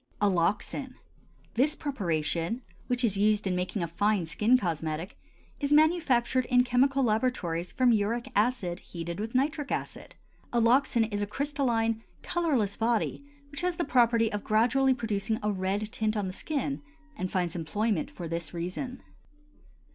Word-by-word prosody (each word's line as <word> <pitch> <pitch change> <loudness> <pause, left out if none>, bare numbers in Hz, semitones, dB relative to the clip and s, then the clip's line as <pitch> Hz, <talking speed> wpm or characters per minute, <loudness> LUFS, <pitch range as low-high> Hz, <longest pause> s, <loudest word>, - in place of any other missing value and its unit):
ALLOXAN. 205 +7 0 0.6
This 280 +6 +2
preparation, 175 - -2 0.2
which 245 0 -1
is 205 -4 +2
used 210 +1 +2
in 185 -2 0
making 180 +1 -2
a - - -1
fine 200 +2 +1
skin 215 +9 +3
cosmetic, 165 -2 -3 0.4
is 285 -1 -1
manufactured 290 -6 +3
in 250 -1 +4
chemical 265 +2 +2
laboratories 215 -8 0
from 255 -2 +3
uric 225 +2 0
acid 205 -5 +1
heated 170 +1 -6
with 220 +3 -4
nitric 290 +2 0
acid. - - -5 0.4
Alloxan 240 +1 +3
is 205 - -1
a 205 - -1
crystalline 235 -4 0 0.2
colorless 275 - 0
body 230 +4 0 0.3
which 285 - -5
has 360 -1 0
the 340 - -1
property 235 -4 +3
of 205 - -3
gradually 255 +5 +3
producing 220 -2 -1
a 210 - +1
red 200 +2 -2
tint 220 0 -1
on 205 - 0
the 185 - -4
skin 280 +4 -3 0.3
and 185 -8 -3
finds 175 -2 -1
employment 185 +3 -1
for 175 - -7
this 170 0 -4
reason. 185 +10 -4
225 Hz, 145 wpm, -29 LUFS, 190-255 Hz, 0.6 s, in